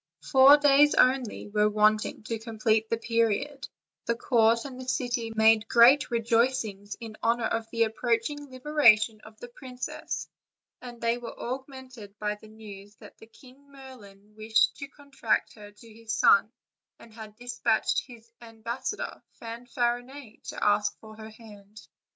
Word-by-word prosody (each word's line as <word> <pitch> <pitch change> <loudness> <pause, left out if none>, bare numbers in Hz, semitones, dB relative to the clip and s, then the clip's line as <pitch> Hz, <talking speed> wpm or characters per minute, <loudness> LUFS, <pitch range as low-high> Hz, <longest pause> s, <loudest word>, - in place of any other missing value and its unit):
Four 270 +1 +7
days 290 0 +4
only 255 -3 +1
were 210 0 +1
want 215 +1 +2
ing - - -8
to 225 +1 -5
complete 220 -1 -1
the 230 - 0
period; 230 +5 -1 0.4
the 235 - +1
court 230 0 +2
and 260 -2 -8
the 255 - -10
city 240 -3 -2
made 220 0 +4
great 250 +6 +5
rejoicings 230 -3 -1
in 225 -2 -9
honor 230 0 0
of 225 0 -3
the 230 0 +1
approaching 240 +6 -2
liberation 235 -6 +3
of 215 0 -16
the 245 - -9
princess, 250 +1 -7 0.5
and 245 -1 -10
they 230 +1 -1
were 240 - -10
augmented 255 -5 -8
by 210 0 -2
the 210 +1 -15
news 205 -2 -13
that - - -15 0.2
King 275 +3 -19
Merlin 210 -7 -15
wished 220 0 +1
to 280 - -7
contract 280 -5 -3
her 210 -2 -13
to 220 +2 -17
his 225 0 -9
son, 210 +2 +4 0.5
and 225 - -17
had 215 -2 -11
dispatched 240 -1 -1
his 230 -2 -15
ambassador 235 - -6 0.2
Fanfarinet 240 +1 -5
to - - -6
ask 210 0 +1
for 215 -1 -13
her 220 0 -10
hand. 210 -2 -15
230 Hz, 150 wpm, -27 LUFS, 215-255 Hz, 0.5 s, Four